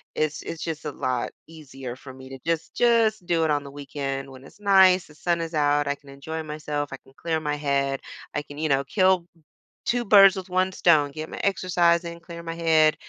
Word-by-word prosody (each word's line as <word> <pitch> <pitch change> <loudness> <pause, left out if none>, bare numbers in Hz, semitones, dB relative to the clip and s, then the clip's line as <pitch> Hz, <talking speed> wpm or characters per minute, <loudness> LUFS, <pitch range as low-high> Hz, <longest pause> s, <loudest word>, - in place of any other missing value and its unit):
it's 155 -1 -1
it's 165 - -6
just 160 -2 -5
a 150 - -2
lot 125 -2 -2 0.2
easier 135 -6 -9
for 130 -1 -11
me 130 0 -12
to 135 0 -9
just 165 -1 -2
just 225 -4 +3
do 170 -2 +1
it 155 - +2
on 145 -1 0
the 140 - -9
weekend 135 -1 -5
when 130 +1 -13
it's 210 - -17
nice, 190 -2 +5
the 150 - -16
sun 170 +1 0
is 165 0 -5
out, 145 -1 +2
I 145 - 0
can 140 - -24
enjoy 160 +4 -6
myself, 150 -1 -4
I - - -5
can 135 - -20
clear 160 -1 -1
my 150 -1 -1
head, 140 -2 0 0.3
I 145 - -1
can, 145 0 -12
you 155 -1 -1
know, 135 0 +2
kill 185 0 +3 0.6
2 240 0 0
birds 195 -2 +7
with 185 0 -6
1 185 +1 +1
stone, 155 -6 +3
get 155 +2 -6
my - - -7
exercise 175 -3 +2
in, 170 0 -7
clear 170 0 -9
my 165 - -4
head, 160 -2 +4
155 Hz, 225 wpm, -25 LUFS, 140-175 Hz, 0.6 s, birds